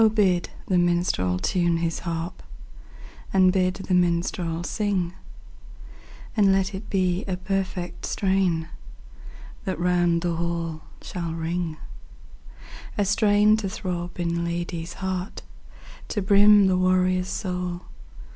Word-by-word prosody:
BID 185 Hz, -5 st, +2 dB, 0.2 s
the 185 Hz, -2 st, +2 dB
minstrel 175 Hz, -, +1 dB
tune 170 Hz, -, +1 dB
his 165 Hz, -1 st, -1 dB
haxp, 165 Hz, 0 st, -4 dB, 0.9 s
And 185 Hz, -1 st, +5 dB
bid 185 Hz, -1 st, +1 dB
the 190 Hz, 0 st, -3 dB
minstrel 170 Hz, -1 st, +1 dB
sing; 190 Hz, -3 st, -1 dB, 1.2 s
And 200 Hz, -3 st, +4 dB
let 190 Hz, +1 st, +1 dB
it 200 Hz, +2 st, -7 dB
be 185 Hz, -1 st, +1 dB
a 185 Hz, -2 st, -2 dB
perfect 185 Hz, -1 st, -3 dB
strain 190 Hz, -4 st, +1 dB, 1.0 s
That 190 Hz, -3 st, -2 dB
round 175 Hz, -1 st, +2 dB
the 170 Hz, -2 st, -1 dB
hall 165 Hz, -2 st, -3 dB, 0.2 s
shall 170 Hz, -2 st, -4 dB
ring: 165 Hz, 0 st, -3 dB, 1.2 s
A 205 Hz, -, +2 dB
strain 210 Hz, +1 st, +4 dB
to 205 Hz, -3 st, -3 dB
throb 180 Hz, -3 st, -5 dB
in 170 Hz, 0 st, -1 dB
lad/s 170 Hz, 0 st, -3 dB
heart, 190 Hz, 0 st, -4 dB, 0.6 s
To 210 Hz, -, -2 dB
brim 205 Hz, +1 st, +6 dB
the 185 Hz, -1 st, +3 dB
warrior's 185 Hz, 0 st, +2 dB
soul. 180 Hz, -2 st, -3 dB
180 Hz, 120 wpm, -25 LUFS, 170-190 Hz, 1.2 s, brim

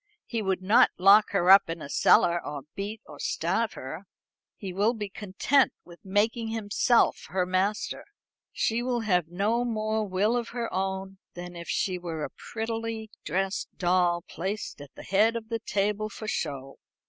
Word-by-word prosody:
He 230 Hz, -2 st, -3 dB
would 190 Hz, -2 st, -1 dB
not 230 Hz, +7 st, +6 dB
lock 200 Hz, +3 st, +6 dB
her 190 Hz, -2 st, +3 dB
up 195 Hz, -3 st, +7 dB
in 165 Hz, 0 st, -4 dB
a 145 Hz, -, -7 dB
cellar, 170 Hz, +4 st, +4 dB
or 145 Hz, -2 st, -6 dB
beat, 205 Hz, +2 st, -5 dB
or 150 Hz, -, -12 dB
starve 190 Hz, +7 st, -1 dB
her. 160 Hz, +9 st, -8 dB, 0.5 s
He 190 Hz, -3 st, -6 dB
will 210 Hz, +6 st, +2 dB
be 210 Hz, -2 st, -5 dB
content 210 Hz, +8 st, +1 dB
with 175 Hz, -1 st, -14 dB
making 215 Hz, +4 st, 0 dB
himself 225 Hz, +2 st, +1 dB
her 185 Hz, -1 st, 0 dB
master. 190 Hz, +3 st, -1 dB, 0.5 s
She 230 Hz, +1 st, 0 dB
will 245 Hz, -1 st, -1 dB
have 180 Hz, -7 st, +1 dB
no 205 Hz, +8 st, 0 dB
more 215 Hz, -2 st, -1 dB
will 200 Hz, +5 st, +1 dB
of 235 Hz, -1 st, -2 dB
her 235 Hz, -1 st, -3 dB
own 190 Hz, 0 st, -3 dB, 0.2 s
than 175 Hz, 0 st, -8 dB
if 170 Hz, 0 st, -8 dB
she 185 Hz, -2 st, 0 dB
were 165 Hz, -3 st, -5 dB
a -, -, -4 dB
prettily 225 Hz, -1 st, -5 dB
dressed 190 Hz, +4 st, -2 dB
doll 175 Hz, -1 st, +2 dB
placed 195 Hz, -3 st, -5 dB
at 145 Hz, -, -10 dB
the -, -, -10 dB
head 215 Hz, +4 st, +3 dB
of 225 Hz, -1 st, -5 dB
the 230 Hz, -1 st, -2 dB
table 210 Hz, 0 st, -1 dB
for 215 Hz, -, -8 dB
show. 135 Hz, -8 st, -4 dB
200 Hz, 170 wpm, -27 LUFS, 180-220 Hz, 0.5 s, up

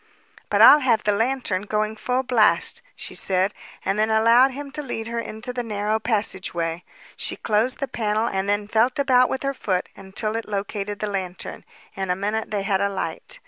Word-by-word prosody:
"But -, -, +5 dB
I'll 300 Hz, -, +10 dB
have 240 Hz, -6 st, +2 dB
the 210 Hz, -, +2 dB
lantern 225 Hz, -3 st, 0 dB
going 215 Hz, +1 st, -1 dB
full 250 Hz, +4 st, -1 dB
blast," 240 Hz, -4 st, +2 dB
she -, -, -7 dB
said, 190 Hz, +1 st, +1 dB, 0.3 s
and 195 Hz, +2 st, 0 dB
then 215 Hz, +1 st, +2 dB
allowed 230 Hz, +4 st, +5 dB
him 280 Hz, +1 st, -7 dB
to 300 Hz, -, -4 dB
lead 225 Hz, -5 st, -5 dB
her 235 Hz, 0 st, -2 dB
into 230 Hz, +2 st, -4 dB
the 245 Hz, -, -2 dB
narrow 215 Hz, -1 st, -1 dB
passageway. 190 Hz, -6 st, -1 dB, 0.3 s
She -, -, -4 dB
closed 225 Hz, +4 st, 0 dB
the 275 Hz, -, -3 dB
panel 215 Hz, -2 st, -1 dB
and 195 Hz, -3 st, -1 dB
then 205 Hz, 0 st, +1 dB
felt 225 Hz, +4 st, +2 dB
about 255 Hz, -3 st, +4 dB
with 265 Hz, -, -3 dB
her 275 Hz, 0 st, 0 dB
foot 185 Hz, -8 st, -2 dB
until 200 Hz, +3 st, -4 dB
it 225 Hz, -1 st, -4 dB
located 205 Hz, 0 st, -3 dB
the -, -, 0 dB
lantern. 190 Hz, -3 st, -5 dB, 0.3 s
In 190 Hz, -1 st, -3 dB
a 180 Hz, -, +2 dB
minute 210 Hz, +3 st, -2 dB
they 205 Hz, -2 st, -2 dB
had 195 Hz, -1 st, +1 dB
a 200 Hz, -, +2 dB
light. 200 Hz, -, -5 dB
215 Hz, 195 wpm, -23 LUFS, 200-245 Hz, 0.3 s, I'll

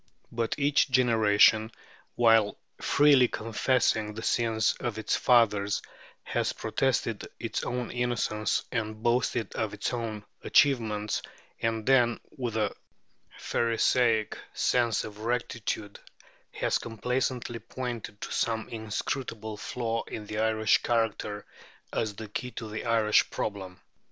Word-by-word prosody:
But 115 Hz, -1 st, -1 dB
each 145 Hz, 0 st, +3 dB
generation, 110 Hz, -3 st, +4 dB, 0.4 s
while 115 Hz, -3 st, +4 dB, 0.2 s
freely 140 Hz, -3 st, +5 dB
confessing 110 Hz, -1 st, 0 dB
the 110 Hz, -, -6 dB
sins 115 Hz, -2 st, +1 dB
of 120 Hz, -3 st, -3 dB
its 110 Hz, -, 0 dB
fathers, 105 Hz, -5 st, +3 dB, 0.4 s
has -, -, -1 dB
protested -, -, -1 dB
its -, -, -3 dB
own 125 Hz, -1 st, -3 dB
innocence 120 Hz, -4 st, 0 dB
and 110 Hz, -1 st, -3 dB
boasted 120 Hz, -2 st, +1 dB
of 105 Hz, -2 st, -2 dB
its 105 Hz, -, -2 dB
own 110 Hz, -3 st, -4 dB, 0.2 s
achievements, 110 Hz, -7 st, +2 dB, 0.4 s
and 115 Hz, -1 st, -1 dB
then, 120 Hz, -3 st, +4 dB, 0.2 s
with 120 Hz, -4 st, -3 dB
a 105 Hz, -2 st, 0 dB, 0.6 s
pharisaic 115 Hz, -1 st, +1 dB, 0.2 s
sense 120 Hz, -3 st, +2 dB
of 105 Hz, -1 st, -9 dB
rectitude, 115 Hz, -2 st, -3 dB, 0.5 s
has -, -, 0 dB
complacently 120 Hz, +1 st, -2 dB
pointed 115 Hz, -2 st, -6 dB
to -, -, -5 dB
some 110 Hz, -1 st, -1 dB
inscrutable 110 Hz, 0 st, -4 dB
flaw 115 Hz, +1 st, -2 dB
in 105 Hz, -, -7 dB
the 105 Hz, +1 st, -4 dB
Irish 110 Hz, -1 st, +3 dB
character 110 Hz, -3 st, -1 dB, 0.5 s
as 110 Hz, -3 st, -1 dB
the 110 Hz, +2 st, -7 dB
key 115 Hz, +4 st, -4 dB
to 115 Hz, -1 st, -7 dB
the 110 Hz, +2 st, -5 dB
Irish 110 Hz, -2 st, +3 dB
problem. 95 Hz, -3 st, -4 dB
115 Hz, 120 wpm, -28 LUFS, 105-120 Hz, 0.6 s, freely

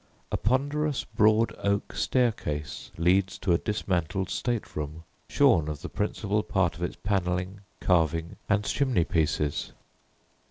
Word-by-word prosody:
A -, -, +1 dB
ponderous 140 Hz, -, 0 dB
broad 110 Hz, +1 st, +3 dB
oak 100 Hz, +1 st, 0 dB
staircase 105 Hz, -, -1 dB
leads 90 Hz, +3 st, +2 dB
to 90 Hz, -, +1 dB
a 85 Hz, -, +3 dB
dismantled 95 Hz, -3 st, -1 dB
state 120 Hz, -3 st, -2 dB
room, 75 Hz, +2 st, -5 dB, 0.3 s
shorn 80 Hz, -2 st, +4 dB
of 75 Hz, +1 st, -5 dB
the 90 Hz, -, -4 dB
principal 105 Hz, 0 st, -1 dB
part 95 Hz, -5 st, 0 dB
of 85 Hz, -, -11 dB
its 90 Hz, -, -2 dB
panelling, 95 Hz, 0 st, -1 dB, 0.2 s
carving, 80 Hz, -2 st, +1 dB
and 100 Hz, 0 st, +3 dB
chimney 125 Hz, -5 st, +1 dB
pieces. 75 Hz, -3 st, 0 dB
95 Hz, 130 wpm, -27 LUFS, 85-105 Hz, 0.3 s, shorn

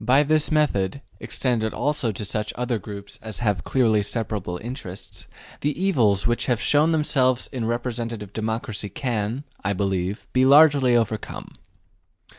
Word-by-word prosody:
By 130 Hz, +6 st, +4 dB
this 155 Hz, +1 st, +3 dB
method, 140 Hz, -6 st, +1 dB, 0.2 s
extended 115 Hz, -4 st, -1 dB
also 145 Hz, -6 st, 0 dB
to 105 Hz, +1 st, -6 dB
such 105 Hz, +1 st, -2 dB
other 120 Hz, -2 st, -1 dB
groups 100 Hz, 0 st, -9 dB
as 110 Hz, -1 st, -6 dB
have 105 Hz, -8 st, 0 dB
clearly 115 Hz, -5 st, +2 dB
separable 105 Hz, -4 st, -3 dB
interests, 110 Hz, -4 st, -7 dB, 0.3 s
the 150 Hz, +3 st, -2 dB
evils 115 Hz, -, +3 dB
which 120 Hz, 0 st, +1 dB
have 120 Hz, -4 st, +1 dB
shown 150 Hz, +6 st, +3 dB
themselves 130 Hz, -5 st, +2 dB
in 125 Hz, -4 st, -3 dB
representative 115 Hz, -3 st, -3 dB
democracy 110 Hz, -1 st, -3 dB
can, 115 Hz, +3 st, -2 dB, 0.2 s
I 100 Hz, +1 st, +1 dB
believe, 95 Hz, +1 st, -2 dB
be 130 Hz, -, +4 dB
largely 140 Hz, -2 st, +6 dB
overcome. 110 Hz, -2 st, -2 dB
115 Hz, 140 wpm, -23 LUFS, 105-130 Hz, 0.3 s, largely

